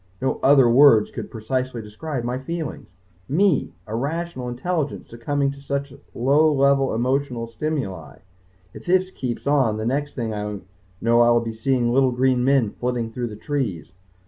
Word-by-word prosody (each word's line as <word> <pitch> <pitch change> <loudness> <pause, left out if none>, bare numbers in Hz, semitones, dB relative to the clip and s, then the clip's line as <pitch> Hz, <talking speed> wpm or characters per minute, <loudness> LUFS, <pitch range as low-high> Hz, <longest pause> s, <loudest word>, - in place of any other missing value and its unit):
No 130 - -1
other 135 -2 +6
words 120 -3 +6
could - - -6
so - - -26
precisely 125 +2 -3
describe 120 +5 -5
my 125 +2 -2
feelings. 160 +2 -5 0.4
Me, 175 +2 +2
a 110 0 -5
rational 145 0 -3
intelligence, 145 +4 -3
succumbing 140 +4 -1
to 140 0 -12
such 140 0 -3 0.2
low 145 +6 +3
level 140 -2 +2
emotional 125 0 -1
stimuli! 115 - -4 0.6
If - - -12
this 185 +1 +2
keeps 125 -8 -5
on, 135 -7 +2
the 110 - -3
next 140 +4 -2
thing 115 -3 -3
I 105 -1 -4 0.4
know 115 +1 +4
I 120 - +5
will 120 0 +5
be 115 -1 -4
seeing 120 +1 0
little 135 0 +4
green 125 0 +2
men 130 -5 +3
flitting 120 -2 -3
through 120 0 -3
the 105 - -8
trees.... 115 - -3
130 Hz, 170 wpm, -23 LUFS, 115-140 Hz, 0.6 s, other